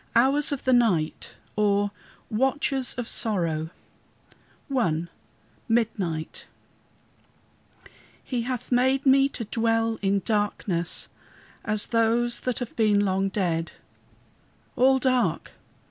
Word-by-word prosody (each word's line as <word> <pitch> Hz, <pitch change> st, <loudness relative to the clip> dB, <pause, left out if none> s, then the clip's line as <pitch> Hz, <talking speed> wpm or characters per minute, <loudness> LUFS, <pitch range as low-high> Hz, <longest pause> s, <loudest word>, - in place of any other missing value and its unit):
HOURS 275 Hz, +6 st, +3 dB
OF 285 Hz, -, -3 dB
THE 260 Hz, -, +2 dB
NIGHT 195 Hz, -11 st, +1 dB, 0.2 s
OR 205 Hz, -1 st, +2 dB, 0.4 s
WATCHES 265 Hz, +2 st, +1 dB
OF 245 Hz, -2 st, -4 dB
SORROW 165 Hz, -7 st, 0 dB, 1.1 s
I 170 Hz, -9 st, 0 dB, 0.6 s
MIDNIGHT 200 Hz, -9 st, -1 dB, 1.8 s
"He 250 Hz, -3 st, -2 dB
hath 250 Hz, +1 st, -4 dB
made 260 Hz, +3 st, +2 dB
me 270 Hz, +1 st, +5 dB
to 230 Hz, -, -5 dB
dwell 225 Hz, +1 st, 0 dB
in 195 Hz, -1 st, +1 dB
darkness 205 Hz, -5 st, -1 dB, 0.6 s
as 215 Hz, -1 st, +1 dB
those 235 Hz, +1 st, +1 dB
that 250 Hz, -3 st, -2 dB
have 245 Hz, -2 st, -6 dB
been 210 Hz, -3 st, +3 dB
long 195 Hz, 0 st, 0 dB
dead." 170 Hz, -4 st, -1 dB, 1.0 s
All 265 Hz, +2 st, +4 dB
dark! 255 Hz, -2 st, 0 dB
225 Hz, 100 wpm, -25 LUFS, 195-250 Hz, 1.8 s, me